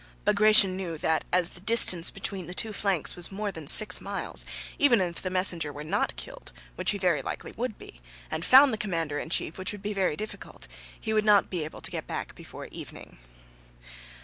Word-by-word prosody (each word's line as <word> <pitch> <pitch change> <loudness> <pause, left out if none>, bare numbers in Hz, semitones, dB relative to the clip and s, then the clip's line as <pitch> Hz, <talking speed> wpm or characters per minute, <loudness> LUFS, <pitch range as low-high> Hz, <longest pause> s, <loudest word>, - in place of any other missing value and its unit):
Bagratión 215 -2 +5
knew 175 -4 -5
that 160 +1 -1
as 180 -1 +2
the - - -8
distance 185 -4 +5
between 190 -5 -6
the 180 - -7
two 220 +2 -2
flanks 195 -6 -2
was 175 +1 -2
more 205 +1 -4
than 160 -5 -10
six 200 +3 +7
miles, 200 0 -2 0.3
even 265 -6 +4
if 175 -2 -3
the 185 - -4
messenger 180 -4 +1
were 145 +1 -9
not 155 - -2
killed - - -10 0.2
(which - - -1
he 205 - +1
very 180 -5 0
likely - - -7
would 235 -2 -5
be), - - -14 0.3
and 160 +1 -4
found 265 +3 +6
the 215 - -4
commander 165 -7 -3
in - - -7
chief 170 +1 -2
(which 185 - -2
would 205 - -11
be 210 +1 -3
very 190 -6 -1
difficult), 215 +4 -9 0.3
he 220 - -4
would 215 0 +1
not 210 -1 +3
be 175 -4 -3
able 155 - -9
to - - -6
get - - -6
back - - -6
before - - -11
evening. - - -11
185 Hz, 205 wpm, -26 LUFS, 165-210 Hz, 0.3 s, six